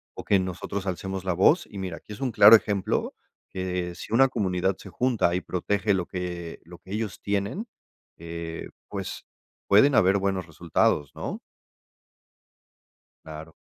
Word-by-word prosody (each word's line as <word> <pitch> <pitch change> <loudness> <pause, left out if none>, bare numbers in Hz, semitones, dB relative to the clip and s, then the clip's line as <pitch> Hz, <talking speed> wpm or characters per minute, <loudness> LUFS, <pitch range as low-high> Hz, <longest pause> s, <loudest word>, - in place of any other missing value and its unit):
o - - -7
que 100 - +3
nosotros 95 +1 -4
alcemos 95 0 -4
la 95 - +1
voz, 100 - +4
y 100 - -7
mira, 90 -3 -4
aquí 105 - -11
es 100 - -11
un 130 -2 0
claro 105 0 +9
ejemplo, 100 -3 0 0.3
que 90 -2 -3
si 90 - -8
una 135 +3 +6
comunidad 95 -6 0
se 95 - -11
junta 120 -6 +1
y 90 - 0
protege 100 +3 0
lo 90 -2 -1
que 90 -2 -5
lo 90 +1 -12
que 90 +2 -15
ellos 105 0 -3
tienen, 100 - -2 0.5
eh, 85 0 -6 0.2
pues - - -6 0.4
pueden 125 +8 +6
haber 95 -1 +4
buenos 95 -2 -1
resultados, 75 -2 0
¿no? - - -5 1.9
Claro. 80 +1 -9
95 Hz, 155 wpm, -26 LUFS, 90-105 Hz, 1.9 s, claro